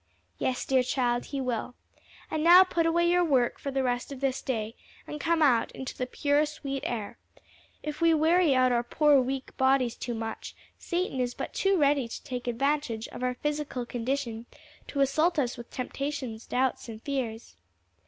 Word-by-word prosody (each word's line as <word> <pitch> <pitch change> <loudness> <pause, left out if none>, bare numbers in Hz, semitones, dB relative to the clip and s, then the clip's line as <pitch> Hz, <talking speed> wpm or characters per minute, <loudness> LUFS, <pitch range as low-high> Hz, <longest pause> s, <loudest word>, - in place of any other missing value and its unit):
"Yes, 255 -1 -1
dear 260 -1 +3
child, 245 -1 0
he 280 - -4
will. 250 -1 -3 0.6
And 310 -1 -1
now 350 +3 +9
put 340 -3 0
away 340 +1 +3
your 355 +1 +4
work 265 -7 +2
for 280 - -4
the 270 -1 0
rest 245 +1 -1
of 275 - -7
this 270 -1 -1
day 225 -4 -3 0.3
and 300 - -6
come 330 -1 +2
out 245 -6 +3
into 265 - -6
the 250 - -3
pure, 285 +3 +2
sweet 280 -3 -5
air. 220 -4 -4 0.6
If 300 +1 -5
we 335 0 +5
weary 320 -1 +4
our 255 -2 +3
poor, 285 +3 +4
weak 265 +1 -4
bodies 265 -2 +3
too 240 -2 -4
much, 225 0 -6 0.2
Satan 350 -6 -2
is 245 -1 -1
but - - -5
too 390 0 +2
ready 285 -4 +3
to 230 - -8
take 250 -3 -5
advantage 245 -2 -1
of - - -9
our 250 0 0
physical 295 -3 -3
condition 240 -1 -3 0.4
to 280 - -2
assault 310 +6 +2
us 255 -4 0
with 235 - -10
temptations, 255 -3 -4
doubts 255 -1 -1
and 220 -1 -7
fears." 245 -5 -4
265 Hz, 180 wpm, -28 LUFS, 245-300 Hz, 0.6 s, now